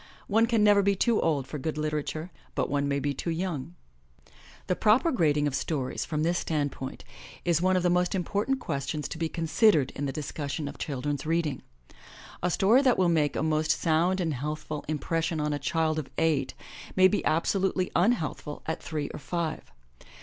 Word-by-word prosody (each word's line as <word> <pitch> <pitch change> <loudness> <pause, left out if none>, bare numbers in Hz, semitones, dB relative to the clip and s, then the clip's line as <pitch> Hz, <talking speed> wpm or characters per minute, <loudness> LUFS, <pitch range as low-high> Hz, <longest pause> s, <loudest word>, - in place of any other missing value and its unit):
*' - - -27
One 230 +1 +5
can 230 -3 +2
never 205 -1 +6
be 200 0 +2
too 230 +3 +2
old 145 -5 +1
for 145 +3 -6
good 155 +3 -3
literature, 155 +2 -3 0.2
but - - -1
one 140 0 +1
may 140 0 0
be 140 +1 -1
too 155 - -4
young. 165 - -3 0.9
The 180 - 0
proper 230 - +4
grading 150 - +2
of 145 - 0
stories 135 -1 -2
from 155 -1 -1
this 175 +2 +1
standpoint 145 -4 -3 0.4
is 170 -2 +2
one 185 0 +3
of 180 - 0
the 180 - +3
most 180 +1 +2
important 205 +8 0
questions 140 - -3
to 165 - -6
be 165 -1 0
considered 165 - +3
in 145 - -3
the - - -2
discussion 145 0 -4
of 140 - -8
children's 145 +1 -3
reading. 160 -5 0 0.8
A 180 - +1
story 210 +9 +4
that 255 -3 +3
will 185 -2 +3
make 155 -3 +2
a - - 0
most 155 0 +1
sound 165 +4 +2
and 165 -4 0
healthful 150 +2 -4
impression 165 +2 -1
on 150 0 0
a 145 - -2
child 160 +2 0
of 150 - -6
eight 155 -5 +1 0.4
may 185 0 +7
be 205 - 0
absolutely 185 +3 +1
un 195 +8 +4
healthful 150 -6 -5
at 160 - -3
three 150 -3 -3
or - - -7
five. 165 - -3
160 Hz, 195 wpm, -28 LUFS, 145-180 Hz, 0.9 s, may